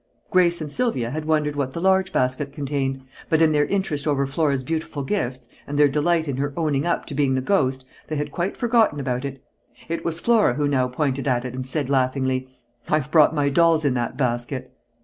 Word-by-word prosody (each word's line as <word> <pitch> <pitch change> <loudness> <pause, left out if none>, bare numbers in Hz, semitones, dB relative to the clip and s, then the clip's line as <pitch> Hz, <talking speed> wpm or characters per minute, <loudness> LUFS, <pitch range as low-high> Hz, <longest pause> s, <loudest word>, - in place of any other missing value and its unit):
Grace 175 -2 +4
and 150 -2 -5
Sylvia 145 - -1
had 155 +2 -4
wondered 150 -2 +1
what 135 -2 -2
the - - -4
large 190 +1 +2
basket 130 0 0
contained, 135 -2 -3 0.3
but 160 - +3
in 160 -1 +4
their 150 -1 +2
interest 165 -7 -1
over 140 -2 +1
Flora's 140 -1 0
beautiful 155 0 -3
gifts, 130 - -3 0.2
and 145 - -3
their 145 0 +6
delight 160 +3 +1
in 135 -3 -2
her 140 +1 -1
"owning 150 -2 0
up" 170 - 0
to - - -6
being 140 -2 +1
the - - +1
"ghost," 130 -5 0 0.2
they 155 - -3
had 145 0 -3
quite 180 +3 -2
forgotten 230 -10 +2
about 130 -2 -2
it. 135 -2 -6 0.5
It 165 0 -3
was 170 0 -2
Flora 220 - +3
who 145 0 0
now 130 -3 +1
pointed 135 +1 -2
at 125 -2 +1
it 125 - -5
and 130 0 -5
said 140 +1 -1
laughingly: 130 -1 0 0.4
"I've 150 -2 0
brought 160 -1 +5
my 145 -1 +2
dolls 165 +1 +3
in 140 - +3
that 120 -2 -2
basket." 125 0 -2
145 Hz, 210 wpm, -23 LUFS, 130-160 Hz, 0.5 s, their